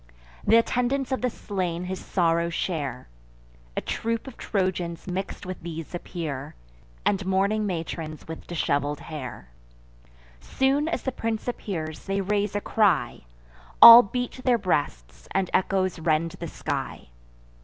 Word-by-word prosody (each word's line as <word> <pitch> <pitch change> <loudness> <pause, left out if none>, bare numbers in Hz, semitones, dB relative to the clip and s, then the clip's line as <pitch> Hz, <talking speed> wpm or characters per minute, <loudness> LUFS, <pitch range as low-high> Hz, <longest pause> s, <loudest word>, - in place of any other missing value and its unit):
Th' - - +5
attendants 250 +3 +1
of 260 - -1
the 250 - +1
slain 180 -6 -3
his 185 +1 -5
sorrow 170 -2 +1
share. 155 -7 -3 0.7
A - - +1
troop 230 0 -2
of 265 -3 -9
Trojans 180 -4 -2
mix'd 190 +1 -4
with 185 0 -6
these 165 -1 -7
appear, 155 -6 -5 0.5
And 195 -1 +1
mourning 200 +3 +1
matrons 165 -3 -5
with 160 0 -8
dishevel'd 145 -3 -1
hair. 130 - -8 0.9
Soon 270 - +1
as 335 - -2
the 265 - -1
prince 225 -2 -3
appears, 160 -10 -4
they 195 0 0
raise 205 +1 0
a 205 - 0
cry; 205 - +1 0.5
All 235 +1 +13
beat 245 +4 -4
their 250 -2 +4
breasts, 65 - -2
and 190 -2 +1
echoes 185 -2 +1
rend 160 0 +1
the - - -7
sky. - - -5
185 Hz, 135 wpm, -26 LUFS, 165-215 Hz, 0.9 s, All